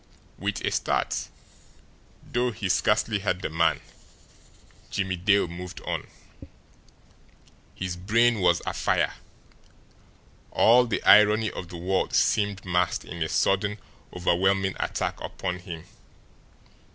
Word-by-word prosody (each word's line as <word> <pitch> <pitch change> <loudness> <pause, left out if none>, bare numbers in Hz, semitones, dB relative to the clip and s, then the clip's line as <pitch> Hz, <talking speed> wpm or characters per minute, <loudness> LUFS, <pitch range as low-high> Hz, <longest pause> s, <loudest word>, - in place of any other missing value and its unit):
With - - -2
a - - 0
start, - - -1 1.0
though 125 +1 -1
he 110 -4 -4
scarcely 105 +2 +2
heard 95 -2 -2
the - - -3
man, 80 0 +1 1.1
Jimmie 95 -2 -2
Dale 100 +2 +2
moved 90 +1 -8
on. - - -4 1.7
His 90 -1 -4
brain 115 +5 +2
was 90 -2 +2
afire. - - 0 1.4
All 125 +2 +5
the 115 - -2
irony 105 +1 +6
of 90 - -7
the 90 - -8
world 95 +3 -1
seemed 100 -2 +1
massed 90 -1 0
in 85 -1 -8
a 80 - 0
sudden, 100 +2 +1 0.3
overwhelming 95 +2 +1
attack - - -2
upon 90 -1 -4
him. 85 -3 -8
95 Hz, 115 wpm, -26 LUFS, 90-105 Hz, 1.7 s, irony